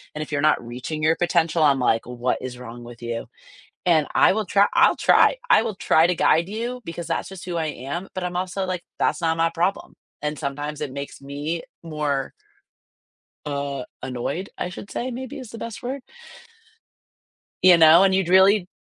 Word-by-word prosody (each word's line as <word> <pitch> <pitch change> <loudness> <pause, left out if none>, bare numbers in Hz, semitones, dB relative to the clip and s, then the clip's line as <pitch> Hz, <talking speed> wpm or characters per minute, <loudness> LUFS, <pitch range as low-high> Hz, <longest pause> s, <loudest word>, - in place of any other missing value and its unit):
and 150 - -4
if 155 - -11
you're 145 -1 0
not 155 -5 +2
reaching 130 +6 -5
your 160 +1 +4
potential, 170 -1 +1
I'm 140 -3 +4
like, 115 -2 +1
what 125 0 -2
is 125 -1 -6
wrong 120 -1 -9
with 120 0 -12
you? 115 -1 -4 0.6
And 160 -4 +3
I - - +6
will 215 -1 -1
try 200 +2 +4
I'll - - +5
try. - - +4
I - - +6
will 220 -4 -3
try 165 -2 +3
to 180 - +1
guide 165 +4 +3
you 240 +4 -4
because 170 0 -6
that's - - -2
just 190 -1 -9
who 175 -2 -3
I 160 -1 -1
am, 150 +7 -5
but 185 - -3
I'm 180 0 -4
also 185 +1 -2
like, 180 -2 -4 0.2
that's - - +1
not 165 0 +1
my 165 0 +2
problem. 175 +4 -1 0.3
And 150 0 -3
sometimes 145 +2 -4
it 145 -3 -3
makes 140 0 -7
me 145 +4 -4 0.2
more 150 -4 -2 1.1
uh, 140 -2 -3 0.2
annoyed, 130 +8 -4
I 180 - -3
should 195 +2 -9
say 255 +1 -3
maybe 255 +2 -6
is 255 -5 -9
the 230 - -9
best 230 +1 -7
word. 260 +2 -4 1.6
You 180 -2 +8
know, 165 +3 +8
and 190 -1 +3
you'd 190 -2 +1
really 190 0 +5
165 Hz, 195 wpm, -23 LUFS, 140-185 Hz, 1.6 s, You